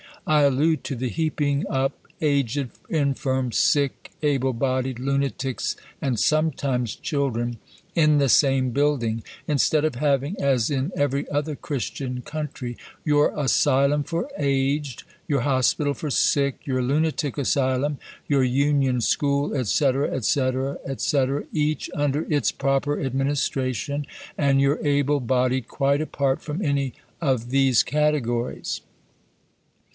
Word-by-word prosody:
I 155 Hz, -1 st, +4 dB
allude 145 Hz, +4 st, +2 dB
to 135 Hz, -, -3 dB
the 125 Hz, +1 st, -2 dB
heaping 150 Hz, -1 st, 0 dB
up 135 Hz, +1 st, 0 dB, 0.3 s
aged, 140 Hz, -3 st, +1 dB, 0.2 s
infirm, 135 Hz, -4 st, 0 dB
sick, 140 Hz, +3 st, +1 dB
able 135 Hz, -3 st, +1 dB
bodied, 130 Hz, +1 st, -1 dB
lunatics, 135 Hz, -1 st, -1 dB, 0.3 s
and 125 Hz, -5 st, 0 dB
sometimes 140 Hz, -6 st, +1 dB
children 120 Hz, -5 st, -2 dB, 0.4 s
in 155 Hz, -2 st, +4 dB
the 140 Hz, -2 st, +3 dB
same 135 Hz, -1 st, +4 dB
building 120 Hz, -5 st, 0 dB, 0.2 s
instead 150 Hz, +1 st, +2 dB
of 155 Hz, -, -1 dB
having, 140 Hz, +4 st, +1 dB
as 135 Hz, -3 st, +2 dB
in 140 Hz, +4 st, -1 dB
every 140 Hz, -1 st, 0 dB
other 145 Hz, +1 st, -1 dB
Christian 135 Hz, -4 st, -4 dB
country, 140 Hz, -5 st, -5 dB, 0.3 s
your 150 Hz, -1 st, +3 dB
asylum 140 Hz, +1 st, +3 dB
for 170 Hz, -, -3 dB
aged, 140 Hz, -1 st, 0 dB, 0.2 s
your 140 Hz, -4 st, +1 dB
hospital 140 Hz, +2 st, +1 dB
for 150 Hz, -, -5 dB
sick, 140 Hz, 0 st, +1 dB
your 130 Hz, -2 st, 0 dB
lunatic 145 Hz, +2 st, 0 dB
asylum, 135 Hz, +1 st, +1 dB, 0.3 s
your 140 Hz, -2 st, +3 dB
union 135 Hz, -1 st, +2 dB
school, 140 Hz, +4 st, +1 dB, 0.2 s
&c., 135 Hz, +6 st, +3 dB, 0.3 s
&c., 130 Hz, +3 st, +2 dB, 0.5 s
&c., 140 Hz, -4 st, +2 dB, 0.3 s
each 155 Hz, 0 st, -1 dB
under 145 Hz, +1 st, 0 dB
its 145 Hz, -7 st, +2 dB
proper 140 Hz, +2 st, 0 dB
administration, 135 Hz, +1 st, -1 dB, 0.3 s
and 140 Hz, -2 st, +3 dB
your 140 Hz, +3 st, +2 dB
able 145 Hz, 0 st, +2 dB
bodied 125 Hz, -1 st, 0 dB
quite 140 Hz, +1 st, +1 dB
apart 140 Hz, -3 st, -1 dB
from 160 Hz, +6 st, -4 dB
any 140 Hz, -3 st, 0 dB, 0.3 s
of 130 Hz, -6 st, 0 dB
these 135 Hz, -2 st, +4 dB
categories. 135 Hz, -5 st, -1 dB
140 Hz, 120 wpm, -24 LUFS, 130-145 Hz, 0.5 s, I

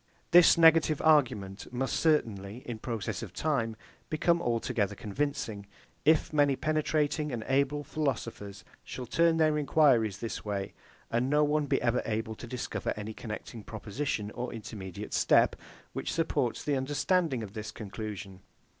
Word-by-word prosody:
This 175 Hz, -1 st, +8 dB
negative 160 Hz, -2 st, +5 dB
argument 120 Hz, -12 st, +2 dB
must 130 Hz, +1 st, -1 dB
certainly, 115 Hz, -8 st, 0 dB
in 115 Hz, -3 st, -5 dB
process 110 Hz, -4 st, -3 dB
of -, -, -8 dB
time, 120 Hz, -8 st, -1 dB, 0.3 s
become 170 Hz, +2 st, +2 dB
altogether 115 Hz, -, 0 dB
convincing, 110 Hz, -3 st, -3 dB, 0.4 s
if 155 Hz, 0 st, +3 dB
many 145 Hz, -2 st, +4 dB
penetrating 150 Hz, 0 st, 0 dB
and 115 Hz, -3 st, -3 dB
able 140 Hz, +2 st, +1 dB
philosophers 115 Hz, -, -4 dB, 0.2 s
shall 125 Hz, -, -6 dB
turn 165 Hz, +6 st, +3 dB
their 155 Hz, -1 st, +3 dB
enquiries 130 Hz, -9 st, +3 dB
this 115 Hz, +1 st, -5 dB
way 100 Hz, -2 st, -3 dB, 0.4 s
and 120 Hz, +3 st, +1 dB
no 150 Hz, +1 st, +4 dB
one 150 Hz, 0 st, +1 dB
be -, -, +2 dB
ever 120 Hz, 0 st, +2 dB
able 110 Hz, 0 st, -2 dB
to 120 Hz, -, -9 dB
discover 125 Hz, +1 st, -3 dB
any 105 Hz, +1 st, -5 dB
connecting 110 Hz, 0 st, -7 dB
proposition 110 Hz, 0 st, -4 dB
or 125 Hz, +2 st, -4 dB
intermediate 105 Hz, -5 st, -7 dB
step, -, -, +4 dB, 0.4 s
which -, -, -3 dB
supports -, -, 0 dB
the 145 Hz, -, 0 dB
understanding 145 Hz, 0 st, 0 dB
in 100 Hz, -2 st, -8 dB
this 110 Hz, 0 st, -5 dB
conclusion. 100 Hz, -3 st, -7 dB
125 Hz, 145 wpm, -30 LUFS, 110-150 Hz, 0.4 s, This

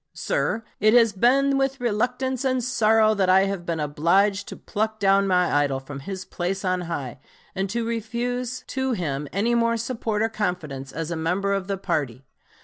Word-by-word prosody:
Sir, 230 Hz, -, -1 dB, 0.2 s
it 215 Hz, +2 st, +4 dB
has 230 Hz, -3 st, +5 dB
been 270 Hz, +6 st, +3 dB
with 270 Hz, 0 st, 0 dB
reluctance 250 Hz, +3 st, -1 dB
and 255 Hz, -2 st, +1 dB
sorrow 220 Hz, -3 st, +3 dB
that 195 Hz, -3 st, +1 dB
I 190 Hz, +1 st, +6 dB
have 195 Hz, -3 st, -2 dB
been 165 Hz, -1 st, -1 dB
obliged 185 Hz, +7 st, +2 dB
to -, -, -8 dB
pluck 220 Hz, 0 st, -2 dB
down 195 Hz, 0 st, +3 dB
my 180 Hz, -2 st, +2 dB
idol 135 Hz, -2 st, 0 dB
from 135 Hz, +1 st, -8 dB
his 190 Hz, +6 st, -6 dB
place 190 Hz, +3 st, -3 dB
on 185 Hz, -1 st, 0 dB
high, 140 Hz, -6 st, -4 dB, 0.3 s
and 195 Hz, 0 st, -2 dB
to 235 Hz, +3 st, -2 dB
refuse 240 Hz, +2 st, -3 dB
to 265 Hz, -1 st, -1 dB
him 150 Hz, -7 st, -3 dB
any 215 Hz, +6 st, +1 dB
more 230 Hz, 0 st, +2 dB
support 225 Hz, -2 st, -2 dB
or 225 Hz, -, +1 dB
confidence 160 Hz, -11 st, -3 dB
as 165 Hz, +1 st, -4 dB
a -, -, -1 dB
member 180 Hz, +5 st, 0 dB
of 195 Hz, -1 st, -2 dB
the 195 Hz, -1 st, -2 dB
party. 135 Hz, -8 st, -2 dB
200 Hz, 185 wpm, -24 LUFS, 175-235 Hz, 0.3 s, I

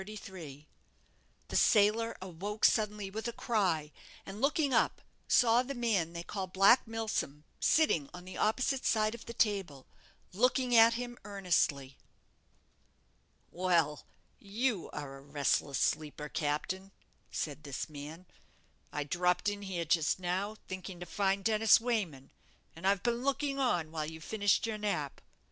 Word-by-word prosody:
The 185 Hz, -8 st, -9 dB, 0.9 s
sailor 220 Hz, +2 st, +3 dB
awoke 195 Hz, +4 st, -2 dB
suddenly 210 Hz, -2 st, +1 dB
with 220 Hz, +3 st, -4 dB
a -, -, -2 dB
cry, 185 Hz, -11 st, 0 dB, 0.3 s
and, 200 Hz, +3 st, -8 dB
looking 280 Hz, 0 st, +2 dB
up, -, -, +2 dB, 0.3 s
saw 235 Hz, -1 st, +5 dB
the 270 Hz, +2 st, -5 dB
man 210 Hz, -9 st, 0 dB
they 170 Hz, 0 st, -5 dB
called 185 Hz, 0 st, -5 dB
Black 200 Hz, +6 st, +5 dB
Milsom 220 Hz, -10 st, -3 dB, 0.2 s
sitting 170 Hz, -, +3 dB
on 180 Hz, 0 st, -10 dB
the 185 Hz, -, -9 dB
opposite 255 Hz, +5 st, +1 dB
side 215 Hz, -1 st, +2 dB
of 235 Hz, -, -10 dB
the 235 Hz, -, -6 dB
table, 195 Hz, -, 0 dB, 0.5 s
looking 250 Hz, +3 st, +2 dB
at 230 Hz, 0 st, +7 dB
him 245 Hz, 0 st, -5 dB
earnestly. 170 Hz, -9 st, 0 dB, 1.5 s
"Well, 170 Hz, -5 st, +1 dB, 0.4 s
you 210 Hz, 0 st, -1 dB
are 140 Hz, -2 st, -7 dB
a -, -, -14 dB
restless 140 Hz, -1 st, 0 dB
sleeper, 150 Hz, 0 st, -1 dB
captain!" 175 Hz, +7 st, -2 dB, 0.4 s
said 150 Hz, -1 st, -4 dB
this 140 Hz, -2 st, -4 dB
man: 155 Hz, +4 st, -9 dB, 0.7 s
"I 150 Hz, -, -2 dB
dropped 180 Hz, +6 st, +1 dB
in 205 Hz, 0 st, -5 dB
here 185 Hz, -4 st, -3 dB
just 160 Hz, -1 st, +2 dB
now, 185 Hz, +4 st, -2 dB
thinking 185 Hz, -1 st, -7 dB
to 175 Hz, -, -6 dB
find 195 Hz, +1 st, 0 dB
Dennis 220 Hz, 0 st, +5 dB
Wayman, 205 Hz, -, -2 dB, 0.4 s
and 165 Hz, +4 st, -3 dB
I've 195 Hz, -1 st, +2 dB
been 240 Hz, 0 st, 0 dB
looking 275 Hz, 0 st, 0 dB
on 175 Hz, -12 st, +1 dB
while 155 Hz, -2 st, -3 dB
you 160 Hz, 0 st, -9 dB
finished 205 Hz, +6 st, +1 dB
your 220 Hz, -2 st, -3 dB
nap. 155 Hz, -10 st, -2 dB
195 Hz, 140 wpm, -32 LUFS, 160-225 Hz, 1.5 s, at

